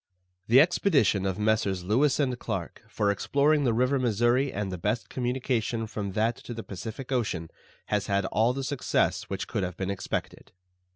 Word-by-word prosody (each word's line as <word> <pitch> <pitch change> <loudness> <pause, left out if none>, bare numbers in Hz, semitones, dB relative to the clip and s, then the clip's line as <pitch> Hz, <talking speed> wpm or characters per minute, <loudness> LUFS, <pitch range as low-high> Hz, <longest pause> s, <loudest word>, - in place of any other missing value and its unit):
The 120 +4 +7
expedition 140 - +3
of 95 -1 -2
Messrs. 105 -4 +1
Lewis 130 +11 +2
and 130 -4 0
Clarke 95 -6 -4
for 100 -1 +1
exploring 145 +7 +2
the 120 - +3
river 125 +4 +2
Missouri 120 +3 +2
and 100 -1 -3
the 90 - -5
best 105 +6 -1
communication 125 -2 -1
from 105 -3 -5
that 110 +3 +1
to 120 - -8
the 115 - -6
Pacific 110 +7 -7
Ocean 100 -10 -1 0.3
has 105 -2 -1
had 100 -1 +1
all 110 +5 +2
the 135 +2 -4
success 140 -1 0
which - - -3
could - - -2
have 90 -1 -4
been 95 0 -2
expected. 100 - -5
115 Hz, 175 wpm, -27 LUFS, 100-130 Hz, 0.3 s, The